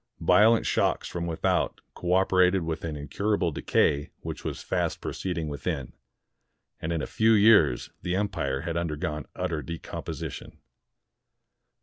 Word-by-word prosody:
Violent 110 +2 +5
shocks - - +1
from 85 -1 -4
without 80 -1 0
cooperated 90 0 +3
with 80 -1 -3
an 80 -2 -3
incur 100 +9 -1
able 90 -4 0
decay 70 0 +1
which - - -6
was - - -4
fast - - -1
proceeding 85 -4 -3
within; 70 -2 -4 0.9
and 80 - -2
in 80 -2 -1
a - - -1
few 110 +1 +3
years 110 +1 +5
the 90 - -1
empire 70 -10 -1
had 85 - -3
undergone 75 -4 -3
utter 80 -2 -2
decom 85 +2 -6
position. - - -6
85 Hz, 135 wpm, -27 LUFS, 75-95 Hz, 0.9 s, Violent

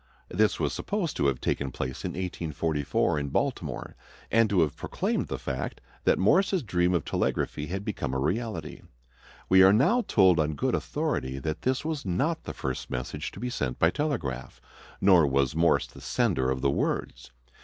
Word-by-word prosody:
This - - +2
was - - 0
supposed 200 -6 -2
to 70 - +2
have 65 -2 0
taken 70 - -1
place 65 +1 -5
in - - -3
1844 80 -5 -1
in 70 -1 -3
Baltimore, - - -2 0.4
and 115 -1 +4
to 95 -4 +3
have 75 -3 +1
proclaimed - - -2
the - - -3
fact 65 0 -4 0.3
that - - +4
Morse's 185 - +3
dream 90 -3 +1
of 85 - -1
telegraphy 75 - -1
had 95 +4 -4
become 75 -10 -3
a - - 0
reality. 90 - -2 0.7
We 95 0 +6
are 95 +1 +8
now 175 - +4
told 95 -5 +5
on 75 -1 +1
good - - 0
authority 65 +1 -2
that 75 +3 -3
this 130 +3 0
was 155 -3 -2
not 135 - -1
the - - -5
first 65 -1 -4
message 65 0 -4
to - - -9
be 125 +2 -3
sent 65 - -2
by 80 - +4
telegraph, 80 - -3 0.4
nor 90 -6 +6
was 70 0 +1
Morse 85 +1 +3
the - - -14
sender 65 -1 +1
of 65 0 -1
the 70 0 +2
words. - - -2
85 Hz, 180 wpm, -27 LUFS, 70-110 Hz, 0.7 s, are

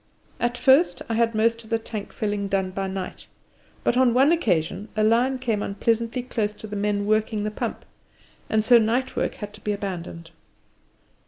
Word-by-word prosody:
At 240 0 0
first 270 +7 +4
I - - 0
had 230 0 +1
most 230 +1 +1
of 220 - -16
the 230 - +2
tank 220 -2 -7
filling 205 -2 -2
done 190 -1 0
by 195 +1 -3
night, 190 -1 -6 0.6
but - - +2
on 250 -2 +4
one 270 +5 +5
occasion 205 - 0
a 215 - +2
lion 240 +4 +3
came 230 -5 -1
unpleasantly 230 +5 -1
close 215 -4 -2
to - - -10
the 210 -1 -6
men 205 0 0
working 215 0 +1
the 210 - -2
pump, - - -4 0.6
and 220 0 +2
so 240 +1 +7
night 240 +4 0
work - - -1
had 210 -1 -7
to 210 - -14
be 210 - -2
abandoned. 170 -4 -6
215 Hz, 185 wpm, -24 LUFS, 205-235 Hz, 0.6 s, so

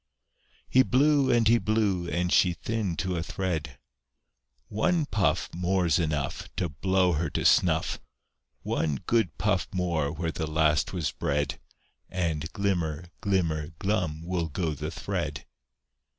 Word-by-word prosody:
He 130 - +5
blew 140 +2 +3
and 120 -2 +4
he 115 +1 +5
blew, 100 -6 0
and 90 0 0
she 90 -2 +4
thinned 100 0 -3
to 90 -1 -1
a - - -1
thread. 85 -6 -3 0.9
"One 160 - +1
puff 105 -9 +1
More's 90 -2 +2
enough 75 -4 -2
To 90 - -1
blow 95 +4 +2
her 80 +1 -1
to - - -2
snuff! - - +3 0.6
One 75 -3 0
good 115 -6 +1
puff 95 0 +1
more 85 -6 0
where 80 +1 -3
the 80 -1 -3
last 75 -1 +2
was 90 -5 -1
bred, 75 +1 -1 0.5
And 80 -4 -2
glimmer, 90 -4 -2
glimmer, 85 -7 0
glum 90 -5 -1
will 85 -2 -2
go 80 +1 -1
the 75 +2 -4
thread!" 80 -4 -4
90 Hz, 135 wpm, -27 LUFS, 80-100 Hz, 0.9 s, He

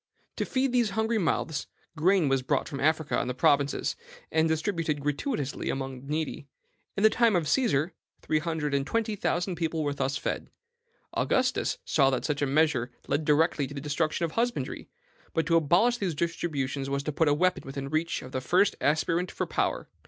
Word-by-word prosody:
"To - - 0
feed 265 0 0
these 240 -3 +2
hungry 220 0 +1
mouths, 160 -4 -1 0.3
grain 175 +1 +3
was 135 -1 +2
brought 130 - 0
from 140 -3 -5
Africa 155 +1 +1
and - - -2
the 125 - -3
provinces, 140 +2 +2 0.4
and 160 0 +3
distributed 160 -2 -1
gratuitously 145 - -2
among 135 -1 -3
the 135 - -13
needy. 150 -1 -3 0.5
In 200 - 0
the 220 - +8
time 230 -4 +3
of 165 -4 +1
Caesar, 170 - +2 0.3
three 155 - 0
hundred 155 -2 -2
and 140 0 0
twenty 225 -2 0
thousand 180 -2 -1
people 160 -1 -1
were 145 -1 0
thus 140 0 -1
fed. - - -3 0.6
Augustus - - +1
saw 135 -3 +3
that 130 -2 -1
such 145 -2 -1
a 145 - +2
measure 140 -4 +2 0.2
led 145 +2 0
directly 150 -1 +3
to 145 - -9
the - - -3
destruction 155 +3 0
of 165 - -4
husbandry; 240 +5 -2 0.5
but 165 - +2
to 165 - +2
abolish 175 +10 +4
these 180 -6 -1
distributions 145 -5 -2
was 140 0 -1
to 150 - -2
put 160 +2 +1
a 145 - +4
weapon 180 +4 +2
within 135 0 -5
the 135 - -5
reach 160 +2 -1
of 130 - -10
the 130 - -2
first 185 +9 +3
aspirant 165 +4 +1
for - - -3
power. - - -1
155 Hz, 195 wpm, -28 LUFS, 140-175 Hz, 0.6 s, the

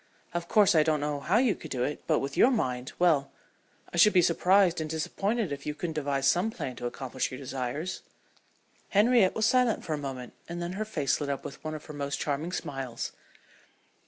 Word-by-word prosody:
Of 175 0 -3
course 210 0 +5
I 160 - +5
don't 155 -1 +2
know 145 0 -2
how 190 +9 +1
you 240 -3 +3
could 160 - -10
do 125 -3 -1
it, 145 - -3
but - - +3
with 135 - -3
your 250 - +6
mind 130 - -1
well, 155 -6 +3 0.6
I - - -3
should 210 +5 +7
be 180 - +6
surprised 180 +1 +3
and 155 - -4
disappointed 195 +6 -1
if 140 0 -5
you 150 - -2
couldn't 165 0 -4
devise 140 -3 -1
some 175 +9 +3
plan 130 - -5
to 120 - -3
accomplish 130 +1 -3
your 130 - -7
desires." 135 +6 -4 0.9
Henriette 210 -1 +4
was 220 - +1
silent 250 -2 +2
for 160 - -2
a 150 - -2
moment, 130 -3 -6 0.2
and 170 0 -4
then 175 +1 -3
her 215 +3 -3
face 150 -10 -1
lit 145 - -2
up 140 - -3
with - - -8
one 155 0 -4
of 150 - -9
her 155 - -9
most 140 -1 -3
charming 150 +4 -2
smiles. 135 -8 -4
155 Hz, 215 wpm, -28 LUFS, 140-185 Hz, 0.9 s, should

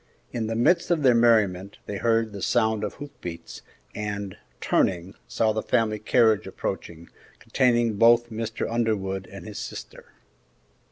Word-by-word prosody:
In 115 -2 -2
the 115 - -2
midst 170 +9 +2
of 165 -4 +1
their 130 -2 +6
merriment 105 -5 +2
they 100 - -5
heard 115 0 +1
the 100 - -7
sound 110 -1 +1
of 105 - -4
hoof 145 0 -9
beats, 85 -1 -8 0.3
and, 100 -2 -4 0.2
turning, 90 +7 0
saw 110 -1 +1
the 110 - -1
family 110 -3 0
carriage 110 0 +3
approaching, 85 0 -5 0.3
containing 120 -4 +1
both 120 +1 +5
Mr. 110 0 -3
Underwood 100 -5 -1
and - - -10
his - - -7
sister. - - -9
110 Hz, 150 wpm, -25 LUFS, 100-120 Hz, 0.3 s, their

